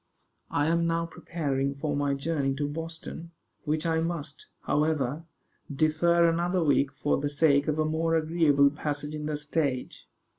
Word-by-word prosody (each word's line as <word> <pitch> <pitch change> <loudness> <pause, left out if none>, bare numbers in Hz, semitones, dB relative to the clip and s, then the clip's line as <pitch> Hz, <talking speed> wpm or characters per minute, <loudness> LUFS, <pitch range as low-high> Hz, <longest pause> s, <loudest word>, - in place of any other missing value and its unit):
I 145 - +1
am 170 +1 +2
now 165 0 0
preparing 140 -5 -2
for 145 +1 -2
my 145 -1 0
journey 140 -2 -1
to 145 +1 -1
Boston, 165 +2 -7 0.4
which 155 +2 -1
I 165 -1 +1
must, 160 -3 -4
however, 150 0 0 0.5
defer 160 +4 +3
another 175 +2 +1
week 140 -2 +2
for 145 +1 0
the 145 +1 -1
sake 145 -1 +3
of 155 0 0
a 155 - +1
more 165 +1 0
agreeable 155 -3 +3
passage 150 0 -3
in 150 0 -4
the 150 -1 -2
stage. 145 -3 -2
155 Hz, 155 wpm, -28 LUFS, 145-165 Hz, 0.5 s, defer